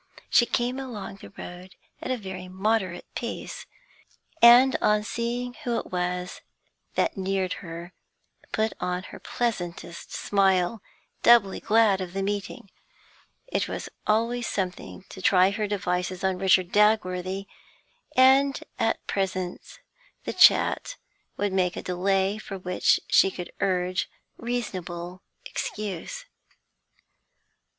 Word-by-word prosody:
So -, -, -22 dB
she 240 Hz, -, +6 dB
came 245 Hz, +3 st, 0 dB
along 230 Hz, -7 st, -6 dB
the -, -, -12 dB
road 180 Hz, +1 st, -9 dB, 0.3 s
at -, -, -5 dB
a 255 Hz, -, 0 dB
very 190 Hz, -3 st, -7 dB
moderate 190 Hz, -1 st, -1 dB
pace, 235 Hz, -1 st, -5 dB, 0.7 s
and, 245 Hz, +3 st, +8 dB
on 210 Hz, 0 st, +3 dB
seeing 240 Hz, +3 st, -3 dB
who 240 Hz, -4 st, 0 dB
it -, -, -5 dB
was 180 Hz, 0 st, -3 dB, 0.5 s
that -, -, +1 dB
neared 190 Hz, -1 st, -1 dB
her, 170 Hz, +1 st, -8 dB, 0.6 s
put 220 Hz, 0 st, 0 dB
on 180 Hz, 0 st, -2 dB
her -, -, -10 dB
pleasantest 175 Hz, -7 st, -4 dB
smile, 195 Hz, +1 st, +1 dB, 0.4 s
doubly 235 Hz, -5 st, +5 dB
glad 215 Hz, -3 st, +3 dB
of 180 Hz, -1 st, -5 dB
the 195 Hz, 0 st, -2 dB
meeting; 200 Hz, -1 st, -4 dB, 0.7 s
it -, -, -1 dB
was -, -, -5 dB, 0.2 s
always 230 Hz, +2 st, +1 dB
something 185 Hz, 0 st, -4 dB
to 190 Hz, -, -9 dB
try 185 Hz, -1 st, +5 dB
her 210 Hz, +1 st, -2 dB
devices 180 Hz, -2 st, -2 dB
on 190 Hz, -1 st, 0 dB
Richard 185 Hz, -1 st, +3 dB
Dagworthy, 195 Hz, -3 st, +2 dB, 0.7 s
and 270 Hz, +2 st, +5 dB, 0.2 s
at 225 Hz, -, 0 dB
present 185 Hz, -2 st, -3 dB, 0.4 s
the -, -, -4 dB
chat -, -, +5 dB, 0.4 s
would 205 Hz, -1 st, -1 dB
make 180 Hz, -2 st, +1 dB
a -, -, -6 dB
delay 190 Hz, +3 st, 0 dB
for 195 Hz, -2 st, -7 dB
which 180 Hz, -1 st, +2 dB
she -, -, +5 dB
could 180 Hz, -2 st, -8 dB
urge 185 Hz, -1 st, 0 dB, 0.3 s
reasonable 185 Hz, -7 st, -4 dB, 0.2 s
excuse. 220 Hz, -, -5 dB
195 Hz, 125 wpm, -26 LUFS, 180-225 Hz, 0.7 s, and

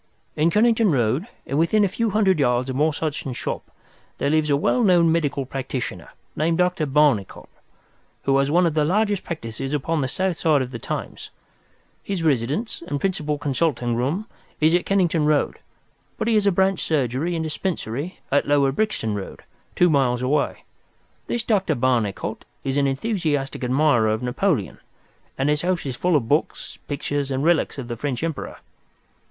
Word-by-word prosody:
"In 155 Hz, +2 st, +3 dB
Kennington 225 Hz, +3 st, +3 dB
Road, 130 Hz, -, +1 dB, 0.2 s
and 140 Hz, +3 st, -1 dB
within 205 Hz, +6 st, +3 dB
a -, -, +2 dB
few 230 Hz, +4 st, -1 dB
hundred 195 Hz, -4 st, +2 dB
yards 125 Hz, -1 st, +1 dB
of -, -, -5 dB
Morse 150 Hz, +2 st, +1 dB
Hudson's 145 Hz, -5 st, -3 dB
shop, -, -, -4 dB, 0.5 s
there 140 Hz, -, 0 dB
lives 155 Hz, -1 st, +2 dB
a 140 Hz, -, +3 dB
well 245 Hz, -, +1 dB
known 175 Hz, -5 st, +5 dB
medical 145 Hz, -4 st, 0 dB
practitioner, 130 Hz, -7 st, -5 dB, 0.3 s
named 165 Hz, +2 st, +1 dB
Dr. 180 Hz, -3 st, +1 dB
Barnicot, 135 Hz, -, +1 dB, 0.8 s
who 135 Hz, -, +2 dB
has 140 Hz, 0 st, +1 dB
one 175 Hz, +4 st, +4 dB
of 165 Hz, -, +1 dB
the 155 Hz, -1 st, +2 dB
largest 205 Hz, +4 st, +1 dB
practices 135 Hz, -3 st, -5 dB
upon 150 Hz, +2 st, 0 dB
the 130 Hz, -, 0 dB
south 185 Hz, +5 st, -1 dB
side 150 Hz, -5 st, +3 dB
of 125 Hz, -, -7 dB
the 115 Hz, -, -6 dB
Thames. -, -, -5 dB, 0.7 s
His 195 Hz, -4 st, -3 dB
residence 145 Hz, -, 0 dB
and 145 Hz, -3 st, -2 dB
principal 150 Hz, -5 st, -1 dB
consulting 130 Hz, -4 st, 0 dB
room 145 Hz, -, -1 dB, 0.3 s
is 155 Hz, +2 st, +4 dB
at 175 Hz, -, +1 dB
Kennington 175 Hz, -5 st, +2 dB
Road, 150 Hz, -1 st, +1 dB, 0.6 s
but 220 Hz, -, -2 dB
he 230 Hz, -, +3 dB
has 210 Hz, -2 st, +3 dB
a -, -, +5 dB
branch 190 Hz, 0 st, +2 dB
surgery 145 Hz, +3 st, 0 dB
and 165 Hz, -, -1 dB
dispensary 155 Hz, -2 st, -3 dB
at 145 Hz, -, +2 dB
Lower 140 Hz, -1 st, +3 dB
Brixton 140 Hz, -, -1 dB
Road, 100 Hz, -2 st, -6 dB, 0.3 s
two 180 Hz, -, +5 dB
miles 130 Hz, -6 st, +2 dB
away. 140 Hz, +3 st, 0 dB, 0.6 s
This 240 Hz, -, -2 dB
Dr. 205 Hz, -4 st, +1 dB
Barnicot 120 Hz, -5 st, -1 dB, 0.2 s
is 135 Hz, 0 st, -2 dB
an 140 Hz, -1 st, +2 dB
enthusiastic 145 Hz, -, -1 dB
admirer 125 Hz, -2 st, +3 dB
of 110 Hz, +2 st, -1 dB
Napoleon, 125 Hz, -, -1 dB, 0.6 s
and 135 Hz, -, 0 dB
his 150 Hz, 0 st, +1 dB
house 180 Hz, -2 st, -1 dB
is 130 Hz, -3 st, -3 dB
full 180 Hz, +6 st, +1 dB
of 125 Hz, -6 st, +1 dB
books, 150 Hz, +5 st, -1 dB
pictures, 145 Hz, -1 st, -2 dB
and 135 Hz, 0 st, -1 dB
relics 165 Hz, -1 st, +2 dB
of 130 Hz, -3 st, -5 dB
the 120 Hz, -, -4 dB
French 130 Hz, +2 st, -3 dB
Emperor. 165 Hz, -4 st, -4 dB
150 Hz, 175 wpm, -23 LUFS, 130-175 Hz, 0.8 s, known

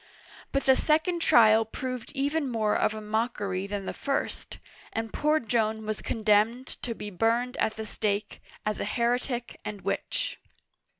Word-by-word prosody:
But 275 Hz, -, +1 dB
the 265 Hz, -, +6 dB
second 320 Hz, +5 st, +2 dB
trial 220 Hz, -5 st, +6 dB
proved 255 Hz, +2 st, -5 dB
even 285 Hz, +1 st, 0 dB
more 220 Hz, -3 st, +1 dB
of 215 Hz, -, +2 dB
a 215 Hz, -, -5 dB
mockery 210 Hz, -3 st, -1 dB
than 200 Hz, -1 st, -4 dB
the -, -, -3 dB
first, 275 Hz, -, -3 dB, 0.3 s
and 225 Hz, -1 st, -3 dB
poor 305 Hz, +1 st, +2 dB
Joan 220 Hz, -2 st, 0 dB
was 215 Hz, 0 st, -3 dB
condemned 220 Hz, +3 st, +2 dB, 0.2 s
to 235 Hz, -2 st, -3 dB
be 210 Hz, -1 st, -6 dB
burned 230 Hz, +6 st, +1 dB
at 220 Hz, -, +1 dB
the 220 Hz, -, -5 dB
stake, 205 Hz, -1 st, -2 dB, 0.2 s
as 215 Hz, -1 st, -1 dB
a -, -, -1 dB
heretic 240 Hz, +2 st, -1 dB
and 210 Hz, -2 st, -6 dB
witch. -, -, -2 dB
225 Hz, 160 wpm, -28 LUFS, 210-250 Hz, 0.3 s, the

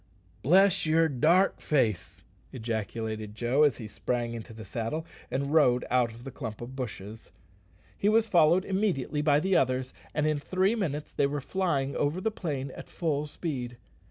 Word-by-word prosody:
"Bless 185 Hz, +3 st, +4 dB
yer 160 Hz, +1 st, +4 dB
dark 160 Hz, +7 st, +3 dB
face!" 110 Hz, -, 0 dB, 0.3 s
ejaculated 110 Hz, -2 st, -4 dB
Joe, 120 Hz, +6 st, +1 dB
as 145 Hz, -6 st, +4 dB
he 110 Hz, -, -7 dB
sprang 120 Hz, +2 st, -2 dB
into 115 Hz, 0 st, -7 dB
the 110 Hz, -1 st, -9 dB
saddle 115 Hz, -, -3 dB, 0.2 s
and 140 Hz, +2 st, -2 dB
rode 125 Hz, -6 st, +4 dB
out 125 Hz, -1 st, +3 dB
of 115 Hz, +2 st, -13 dB
the 135 Hz, -, -7 dB
clump 115 Hz, -6 st, -6 dB
of 120 Hz, +2 st, -8 dB
bushes. 110 Hz, -4 st, -7 dB, 0.7 s
He 205 Hz, -, +1 dB
was 220 Hz, +1 st, +4 dB
followed 175 Hz, -2 st, +4 dB
immediately 190 Hz, -, 0 dB
by 145 Hz, -1 st, +4 dB
the 190 Hz, +4 st, +1 dB
others, 130 Hz, 0 st, +1 dB, 0.2 s
and 150 Hz, 0 st, 0 dB
in 155 Hz, -1 st, +1 dB
three 185 Hz, +7 st, +1 dB
minutes 150 Hz, -10 st, -3 dB
they 140 Hz, -, +2 dB
were 145 Hz, +1 st, -2 dB
flying 140 Hz, -4 st, -1 dB
over 145 Hz, +5 st, 0 dB
the 220 Hz, +4 st, -1 dB
plain 140 Hz, -9 st, -4 dB
at -, -, -10 dB
full 150 Hz, -3 st, -1 dB
speed. 130 Hz, -7 st, -5 dB
140 Hz, 170 wpm, -28 LUFS, 120-165 Hz, 0.7 s, Bless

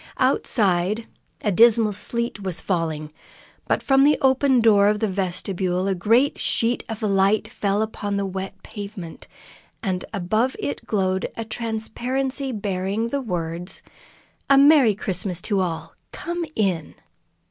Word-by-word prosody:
Outside, 200 Hz, 0 st, +1 dB, 0.4 s
a 210 Hz, -, 0 dB
dismal 225 Hz, +1 st, +5 dB
sleet 235 Hz, +1 st, -2 dB
was 185 Hz, -3 st, -2 dB
falling, 160 Hz, -4 st, -2 dB, 0.5 s
but -, -, 0 dB
from 270 Hz, -1 st, +4 dB
the 295 Hz, +2 st, +5 dB
open 265 Hz, -1 st, +3 dB
door 210 Hz, -3 st, +5 dB
of 210 Hz, 0 st, +2 dB
the 220 Hz, -, +1 dB
vestibule 185 Hz, -1 st, -2 dB
a 195 Hz, -, +2 dB
great 225 Hz, +10 st, +2 dB
sheet 235 Hz, +1 st, +1 dB
of 225 Hz, 0 st, -5 dB
light 200 Hz, +1 st, +2 dB
fell 205 Hz, -1 st, -1 dB
upon 205 Hz, -2 st, -3 dB
the 200 Hz, -, -1 dB
wet 190 Hz, 0 st, -6 dB
pavement, 200 Hz, -5 st, -8 dB, 0.6 s
and 185 Hz, -3 st, -1 dB
above 215 Hz, +6 st, 0 dB
it 145 Hz, +1 st, -5 dB
glowed 190 Hz, -3 st, 0 dB
a 230 Hz, -, -4 dB
transparency 245 Hz, +5 st, -2 dB
bearing 200 Hz, +1 st, -2 dB
the 280 Hz, +3 st, -2 dB
words: 175 Hz, -4 st, -4 dB, 0.7 s
"A 275 Hz, -, +6 dB
Merry 275 Hz, -6 st, +6 dB
Christmas 190 Hz, -3 st, 0 dB
to 205 Hz, -3 st, 0 dB
all! 170 Hz, -3 st, -4 dB, 0.2 s
Come 345 Hz, -1 st, -4 dB
in!" 185 Hz, -7 st, -1 dB
205 Hz, 135 wpm, -23 LUFS, 185-230 Hz, 0.7 s, A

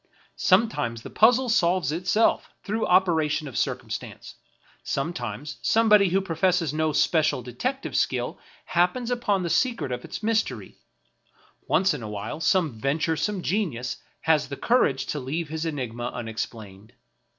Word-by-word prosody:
Sometimes 185 Hz, -, +1 dB
the -, -, -9 dB
puzzle 245 Hz, +4 st, +4 dB
solves 175 Hz, -, +2 dB
itself 185 Hz, +7 st, +1 dB
through 220 Hz, +2 st, -1 dB
operation 160 Hz, -5 st, +2 dB
of 130 Hz, -, -9 dB
circumstance; -, -, -4 dB, 0.5 s
sometimes 135 Hz, -2 st, -4 dB
somebody 210 Hz, -3 st, +4 dB
who 190 Hz, +3 st, +2 dB
professes 175 Hz, -3 st, +1 dB
no 155 Hz, 0 st, +1 dB
special 155 Hz, -4 st, +2 dB
detective 250 Hz, -, -4 dB
skill -, -, 0 dB, 0.3 s
happens 180 Hz, +8 st, +1 dB
upon 210 Hz, -6 st, 0 dB
the 170 Hz, -, -2 dB
secret 230 Hz, -, +1 dB
of 125 Hz, -, -4 dB
its -, -, -7 dB
mystery; 210 Hz, -, -1 dB, 0.9 s
once 190 Hz, +1 st, +3 dB
in 145 Hz, -, -5 dB
a 110 Hz, -, -6 dB
while 105 Hz, +7 st, -5 dB
some 160 Hz, -, +1 dB
ven 135 Hz, +6 st, 0 dB
turesome 170 Hz, +5 st, -1 dB
genius 150 Hz, -, -1 dB, 0.2 s
has 150 Hz, -3 st, +2 dB
the 140 Hz, -, -5 dB
courage 140 Hz, -, +2 dB
to 150 Hz, -, -3 dB
leave 150 Hz, +5 st, -3 dB
his 160 Hz, +1 st, -3 dB
enigma 125 Hz, -5 st, -4 dB
unex 115 Hz, -2 st, -3 dB
plained. 105 Hz, 0 st, -13 dB
160 Hz, 140 wpm, -25 LUFS, 130-195 Hz, 0.9 s, puzzle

